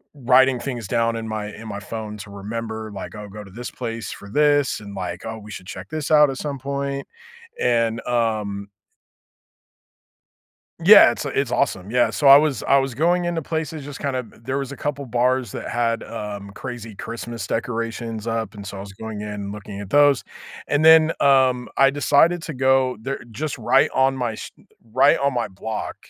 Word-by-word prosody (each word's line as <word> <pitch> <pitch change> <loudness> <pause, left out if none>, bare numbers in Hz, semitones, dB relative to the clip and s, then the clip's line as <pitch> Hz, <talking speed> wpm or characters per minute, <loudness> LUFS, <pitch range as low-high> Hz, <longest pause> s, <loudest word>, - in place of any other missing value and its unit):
writing 130 -1 +4
things 120 -5 -5
down 115 0 +1
in 115 -1 -4
my 110 -1 -4
in 110 +1 -10
my 100 - -5
phone 105 0 -6
to 100 0 -10
remember, 110 +2 -5
like, 95 +2 -7
"I'll 105 -1 -8
go 105 +1 -9
to 95 - -14
this 120 +5 -7
place 115 -2 -5
for 100 - -10
this," 145 +2 +2
and, 100 -1 -10
like, 90 -2 -5
"Oh, 110 0 -5
we 105 0 -12
should 95 -3 -8
check 95 0 -8
this 155 -1 -4
out 150 -1 +7
at 135 - -4
some 140 -3 -4
point." 140 0 -3 0.5
And, 115 -1 +1
um 110 -4 -1 2.2
Yeah, - - +9
it's - - -5
it's - - -1
awesome, 95 +3 -1
yeah, 125 0 +3
so, 145 - -3
I 135 +1 +11
was 150 -2 +1
I 140 - +4
was 135 -3 -2
going 175 +4 +2
into 170 -1 -1
places 160 -1 -4
just 145 -1 -8
kind 140 -3 -2
of 125 -2 -4
t - - -20
there 135 +2 -2
was 140 -1 -4
a 140 - -8
couple 145 -1 -3
bars 125 -1 +1
that - - -6
had, 115 -1 0
um, 105 -3 -6
crazy 115 -3 -8
Christmas 115 +1 -6
decorations 115 -1 -3
up, 115 -2 -2
and, 100 -1 -9
so, 100 0 -7
I - - -7
was 100 0 -9
going 110 0 -7
in 105 - -5
and 100 -1 -5
looking 100 -1 -8
at 100 -1 -7
those, 145 -3 +5 0.4
and 145 +1 +1
then, 160 0 +7
um, 130 -3 +3
I 135 0 +6
decided 145 +4 +3
to 160 - -5
go 130 -1 +2
there 135 +4 -4
just 145 +6 -4
right 120 +4 +3
on 135 0 +3
my 120 -2 -1
s - - -8 0.4
right 135 +4 +4
on 140 -1 +1
my 120 - 0
block, 110 +3 -5
120 Hz, 200 wpm, -22 LUFS, 110-140 Hz, 2.2 s, I